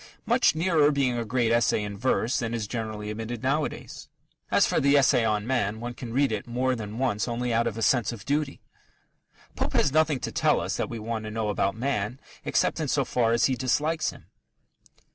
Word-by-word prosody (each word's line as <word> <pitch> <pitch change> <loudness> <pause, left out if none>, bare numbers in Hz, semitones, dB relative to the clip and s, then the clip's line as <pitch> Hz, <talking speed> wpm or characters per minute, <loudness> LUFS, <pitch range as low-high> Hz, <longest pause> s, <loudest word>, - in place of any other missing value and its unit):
much - - +3
nearer 160 -3 +3
being 135 -4 +1
a 120 - -1
great 115 0 0
essay 115 -2 +2
in 105 -1 -5
verse 120 +3 0
than 115 -2 -2
is 110 -2 -2
generally 110 -1 -4
admitted 115 +2 -5
nowadays. 145 +3 -2 0.4
As - - +4
for - - +1
the 140 +1 +4
Essay 135 -3 +4
on 105 -2 0
Man, 110 -4 0
one 120 +1 -5
can 120 -1 -8
read! 135 +2 +2
it 110 +1 -3
more 125 +2 0
than 110 -1 -6
once 125 -5 0
only 120 0 -2
out 115 +1 +2
of 115 -1 -3
a 115 - -2
sense 120 -3 +2
of 110 -3 -9
duty. 145 0 -1 0.9
Pope - - -2
has 145 - +3
nothing 155 -2 +2
to - - -3
tell - - +2
us - - -2
that - - -2
we 115 - -5
want 110 0 -4
to - - -4
know 110 -1 -2
about 100 -1 0
man 120 -1 -2 0.2
except - - +1
in - - -1
so - - +1
far 115 -2 +1
as 115 0 +3
he 135 - +2
dislikes 150 +5 0
him. - - -11
120 Hz, 215 wpm, -26 LUFS, 110-135 Hz, 0.9 s, As